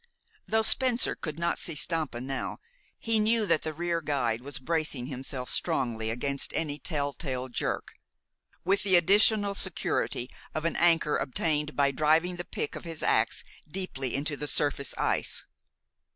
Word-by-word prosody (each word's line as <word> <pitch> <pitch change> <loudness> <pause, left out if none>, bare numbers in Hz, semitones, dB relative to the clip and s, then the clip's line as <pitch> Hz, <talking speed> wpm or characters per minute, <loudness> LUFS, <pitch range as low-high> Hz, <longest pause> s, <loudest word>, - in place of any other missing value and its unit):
Though 220 0 +2
Spencer 250 +1 +3
could 155 -2 -6
not 170 0 0
see 165 - 0
Stampa 155 -5 -1
now, 135 +1 -4 0.4
he 225 -1 +1
knew 220 +1 +3
that 160 - +2
the 155 - -3
rear 170 +1 -1
guide 120 -7 0
was 140 +2 -5
bracing 150 -3 -1
himself 130 -1 -4
strongly 115 -4 0
against 140 +4 -1
any 150 -2 -1
tell 145 -4 -2
tale 130 -4 -4
jerk, 120 - -2 0.7
with 195 +2 +3
the 195 -2 +4
additional 200 +3 +4
security 185 -9 -1 0.3
of 155 +1 -2
an 165 - 0
anchor 165 -3 +4
obtained 150 +2 -1
by 140 -1 +3
driving 160 +5 +2
the 175 - -4
pick - - -4
of - - -7
his 165 -2 -6
ax - - +2 0.3
deeply 145 -8 -3
into 145 +2 -1
the 150 +1 -4
surface 145 -2 +1
ice. - - 0
155 Hz, 155 wpm, -29 LUFS, 135-175 Hz, 0.7 s, the